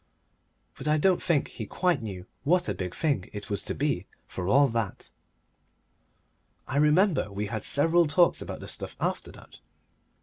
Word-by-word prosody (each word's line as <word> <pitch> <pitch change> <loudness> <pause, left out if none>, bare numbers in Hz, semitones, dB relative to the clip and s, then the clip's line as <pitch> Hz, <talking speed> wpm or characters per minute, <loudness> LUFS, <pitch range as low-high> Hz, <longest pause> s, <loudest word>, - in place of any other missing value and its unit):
But 135 - -5
I 150 0 +3
don't 185 +3 +3
think 165 -6 +1
he 110 - -7
quite 180 - +1
knew 95 -5 -6 0.2
what 175 +4 +2
a - - 0
big 90 -2 -5
thing 140 - 0
it 105 0 -7
was 100 -1 -1
to - - -3
be, 135 -10 -1 0.2
for 90 -1 -5
all 140 +7 +5
that. 115 -3 -3 1.6
I 135 - -2
remember 150 - +3
we 100 +1 -3
had 110 +1 -4
several 165 +3 +3
talks 170 +4 +3
about - - -6
the - - -8
stuff - - -4
after - - -2
that. - - -15
140 Hz, 170 wpm, -27 LUFS, 105-165 Hz, 1.6 s, all